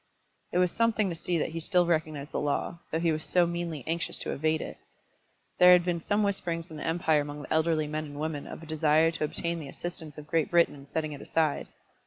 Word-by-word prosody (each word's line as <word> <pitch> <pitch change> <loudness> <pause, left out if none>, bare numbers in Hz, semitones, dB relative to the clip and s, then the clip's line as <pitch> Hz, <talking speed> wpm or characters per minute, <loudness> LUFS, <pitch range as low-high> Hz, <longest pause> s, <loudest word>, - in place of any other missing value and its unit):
It - - 0
was 180 -1 +3
something 225 -3 +2
to 170 - -3
see 170 +1 -1
that - - 0
he 165 - -4
still 180 +2 +3
recognised 155 -4 -1
the - - -1
law, 150 +3 -1
though 160 - 0
he 165 -1 +2
was 155 0 -2
so 180 -1 +3
meanly 170 -4 -3
anxious 165 0 -1
to - - -3
evade 155 +2 +1
it. - - -6 0.8
There 180 0 +9
had 175 -1 +5
been 175 -1 0
some 205 +5 +1
whisperings 170 -4 -2
in 155 - -7
the 150 - -4
empire 160 -2 +2
among 145 0 -6
the - - -3
elderly 160 -1 +2
men 155 +1 -3
and 145 -1 -8
women 155 -2 -3
of - - -8
a - - -8
desire 155 +1 +3
to 165 - -4
obtain 170 +2 -1
the 145 -3 -7
assistance 160 -1 -6
of 150 - -8
Great 160 0 +1
Britain 170 -1 +4
in 140 -1 -13
setting 155 +1 -2
it 140 - -9
aside. 155 -3 0
160 Hz, 240 wpm, -29 LUFS, 155-170 Hz, 0.8 s, There